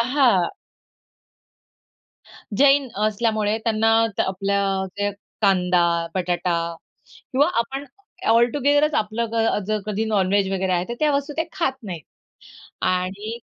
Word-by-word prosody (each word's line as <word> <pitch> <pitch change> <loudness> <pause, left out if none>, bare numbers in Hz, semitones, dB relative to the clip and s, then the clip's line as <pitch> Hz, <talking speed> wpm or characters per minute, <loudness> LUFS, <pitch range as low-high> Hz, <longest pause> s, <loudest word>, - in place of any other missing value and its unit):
अ 230 - +2
हां. 250 -10 +3 2.1
जैन 280 -1 +5 0.2
असल्यामुळे 215 0 0
त्यांना 225 -1 +2 0.3
त - - +2
आपल्या 200 +1 0 0.4
जे 205 0 0 0.3
कांदा, 180 -3 +2
बटाटा 180 -1 0 0.8
किंवा 285 +5 +3
आपण 270 +4 -2 0.5
ऑल 235 +1 +5
टूगेदरच 290 +2 +2
आपलं 220 +2 0
ग - - -4
अ, - - +1
जर 215 -1 -1
कधी 215 +1 -1
नॉन-व्हेज 200 -2 +1
वगैरे 190 -1 0
आहे, 175 0 +1
तर 235 - -3
त्या 300 -1 +3
वस्तू 285 +1 -3
ते 325 - 0
खात 330 -8 0
नाहीत 170 -7 -6 0.9
आणि 195 +5 -3
215 Hz, 130 wpm, -22 LUFS, 190-255 Hz, 2.1 s, जैन